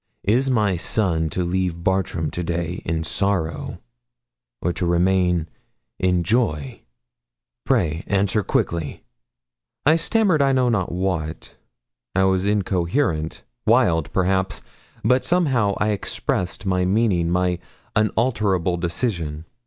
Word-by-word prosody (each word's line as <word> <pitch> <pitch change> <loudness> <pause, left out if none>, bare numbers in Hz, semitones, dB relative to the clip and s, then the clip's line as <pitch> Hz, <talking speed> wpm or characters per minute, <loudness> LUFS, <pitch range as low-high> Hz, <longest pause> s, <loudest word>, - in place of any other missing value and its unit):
Is 125 +7 +2
my 105 -7 +2
son 85 -3 +1
to 90 - -1
leave 90 -1 -1
Bartram 95 -5 0
to 90 +2 -3
day 85 +1 -3
in 80 0 -1
sorrow, 85 -3 -1 0.8
or 90 - -1
to 90 - -1
remain 90 -1 +2 0.5
in 90 -2 +2
joy? 80 - 0 0.9
Pray 80 +2 +1
answer 100 +1 +2
quickly.' 85 -5 -2 0.8
I 155 +3 +5
stammered 185 -2 +2
I 135 -1 +3
know 130 -2 +3
not 105 -6 0
what. 85 -3 -3 0.6
I 95 - +3
was 95 0 +2
incoherent 90 - 0 0.2
wild, 80 -3 +3
perhaps; 95 0 0 0.4
but 125 +3 +3
somehow 130 - +2
I 105 - +1
expressed 100 -2 -2
my 90 -1 +1
meaning 95 -3 +2
my 90 0 +1 0.4
unalterable 105 -5 +1
decision. 85 -3 -2
95 Hz, 115 wpm, -22 LUFS, 85-105 Hz, 0.9 s, I